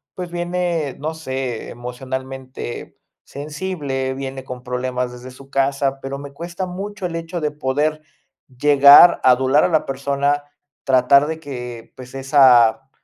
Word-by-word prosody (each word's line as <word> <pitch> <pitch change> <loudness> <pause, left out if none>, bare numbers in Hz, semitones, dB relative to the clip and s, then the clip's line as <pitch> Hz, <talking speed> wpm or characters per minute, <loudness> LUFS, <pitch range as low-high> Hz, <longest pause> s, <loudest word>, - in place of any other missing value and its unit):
pues 180 -2 -6
viene, 175 -4 -2
no 155 +3 -4
sé, 130 -6 -5
emocionalmente 130 +1 -7 0.3
sensible, 145 -3 -4
viene 135 0 -6
con 125 -1 -8
problemas 125 0 -3
desde 125 +1 -10
su 135 +2 -15
casa, 135 0 0
pero 135 +1 -5
me 140 0 -10
cuesta 170 +4 -6
mucho 195 +1 -5
el 165 - -7
hecho 165 +1 -5
de 150 - 0
poder 150 +2 -1 0.4
llegar 140 +5 +7
a 130 - +6
adular 130 +3 +3
a - - +2
la 160 -3 +1
persona, 140 +1 -1 0.4
tratar 135 +2 +4
de 160 +1 -4
que, 125 -6 -8
pues 130 -1 -12
esa 135 -2 +4
135 Hz, 145 wpm, -20 LUFS, 130-155 Hz, 0.4 s, llegar